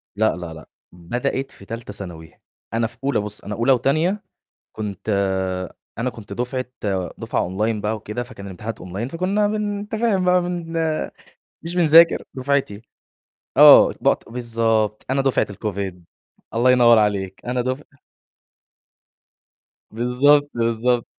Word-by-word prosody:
لأ، 110 -2 +2
لأ، 85 -2 -7
لأ، 80 -2 -11 0.3
بدأت 120 +10 -3
في 100 - -15
تالتة 115 -1 -7
ثانوي، 85 -5 -8 0.4
أنا 115 0 +1
في 115 +1 -16
أولى 140 -3 +1
بُصّ، 105 0 -4
أنا 105 - -5
أولى 115 +5 +2
وتانية 155 - +1 0.5
كنت 105 -2 -6
آآ 95 -2 -1 0.2
أنا 125 +2 0
كنت 115 -4 -11
دفعة 125 +1 -2 0.5
دفعة - - -1
Online 105 +4 -1
بقى 105 +2 -1
وكده 105 +3 -5
فكان 120 -5 -10
الامتحانات 105 +4 -7
Online 95 +6 -4
فكنّا 190 +5 +1
بن 205 -1 -2
أنت 205 +2 -9
تفاهم 220 -4 +1
بقى 180 0 +4
بن 175 -2 -4 0.9
مش 165 +1 -5
بنذاكر 165 -1 +6
دُفعتي، 130 -6 -1 0.8
آه، - - +9
بقط - - +1
بالضبط، 115 -3 0
أنا 135 +1 +2
دفعة 135 -1 +1
الCovid 100 -1 -4 0.6
الله 120 +3 +4
ينوّر 120 -2 +6
عليك، 100 -3 -1
أنا 125 0 -1
دُفع 130 +4 -3 2.1
بالضبط، 135 +6 +3
بالضبط. 120 +1 +1
115 Hz, 135 wpm, -22 LUFS, 105-140 Hz, 2.1 s, آه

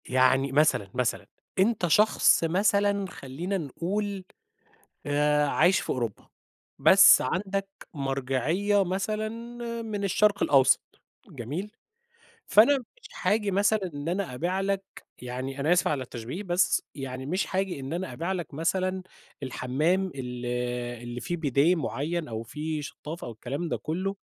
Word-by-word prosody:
يعني 130 +1 +3
مثلًا 145 -8 +2
مثلًا 125 -1 -1 0.3
أنت 195 -2 +2
شخص 210 +1 +4
مثلًا 200 +3 +2
خلّينا 170 +8 -4
نقول 190 +6 -3 0.8
آآ 150 0 +2
عايش 175 +6 +4
في - - -7
أوروبا، 120 -5 -3 0.5
بس - - +8
عندك 195 +7 -2 0.3
مرجعية 140 +9 0
مثلًا 215 +4 -2 0.5
من 215 -3 -4
الشرق 200 +1 +2
الأوسط، 130 -2 +5 0.5
جميل؟ 145 - -5 0.8
فأنا 255 +7 +6
مش 380 - -15
هاجي 210 -1 +2
مثلًا 205 +3 +2
إن 145 +2 -5
أنا 180 -6 -2
أبيع 175 +8 -1
لك 195 0 0 0.4
يعني- 130 +2 -5
أنا 155 +5 +2
آسف 180 - +3
على 140 -3 -1
التشبيه- 125 - -6
بس 180 -1 +2
يعني 130 -1 -6
مش 185 +4 -2
هاجي 190 -6 -1
إن 135 +2 -6
أنا 175 -3 -3
أبيع 165 +9 -3
لك 175 -5 -5
مثلًا 185 +4 -1 0.4
الحمّام 150 +9 0
ال 125 -2 -6 0.6
اللي 120 0 -6
فيه 175 - -3
بيديه 150 +2 +3
معيّن 160 +1 -3
أو 110 -1 -4
فيه 150 +6 -4
شطافة 150 +3 -7
أو 120 - -6
الكلام 135 +9 -4
ده - - -1
كلّه. 190 +5 -3
165 Hz, 135 wpm, -27 LUFS, 135-195 Hz, 0.8 s, بس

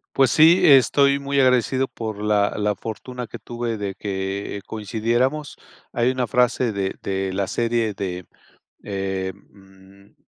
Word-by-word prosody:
Pues 135 -2 +4
sí, 160 +9 +6
estoy 140 -2 +5
muy 140 0 -1
agradecido 130 0 +2
por 110 -2 -6
la 105 -1 +2
la 105 0 0
fortuna 125 +4 -6
que 110 - -10
tuve 120 -1 -4
de 100 -2 -4
que, 95 0 -4
eh, 100 - -8
coincidiéramos. 120 +8 -2 0.3
Hay 120 +2 +1
una 130 -1 -2
frase 125 +1 +2
de 100 -2 -3
de 95 -1 -2
la 95 0 -1
serie 115 -3 -1
de, 90 -3 -5 0.6
em 95 0 -7
110 Hz, 140 wpm, -22 LUFS, 100-125 Hz, 0.6 s, sí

